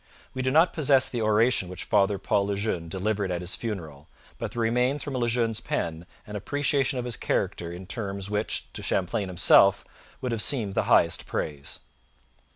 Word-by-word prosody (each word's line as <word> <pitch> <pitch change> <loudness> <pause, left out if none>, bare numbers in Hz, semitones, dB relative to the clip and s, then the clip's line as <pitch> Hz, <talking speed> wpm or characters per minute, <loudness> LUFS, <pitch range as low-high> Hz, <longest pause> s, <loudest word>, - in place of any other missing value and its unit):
We 130 - -3
do 130 - +1
not 160 +6 +4
possess 135 -4 +3
the 120 - -3
oration 110 -2 +2
which 90 -1 -6
Father 100 -1 +2
Paul 100 +1 0
Le 100 - -1
Jeune 95 -5 -2
delivered 100 +2 -1
at 90 0 -2
his 90 +1 -4
funeral, 80 -10 -6 0.3
but - - -4
there 120 - -3
remains 125 +5 +1
from 145 - -5
Le 120 -2 0
Jeune's 115 -2 0
pen 85 -6 -3 0.2
an 105 -2 -8
appreciation 135 +4 0
of 125 - -3
his 120 -2 -2
character 85 -4 -2
in 90 +2 -8
terms 100 -1 -4
which 105 +1 -2
to - - -5
Champlain 95 +2 -1
himself 95 +2 +5 0.3
would 125 - -3
have 115 -2 0
seemed 110 -6 +2
the - - 0
highest - - +3
praise. 70 -3 -4
105 Hz, 185 wpm, -26 LUFS, 95-125 Hz, 0.3 s, himself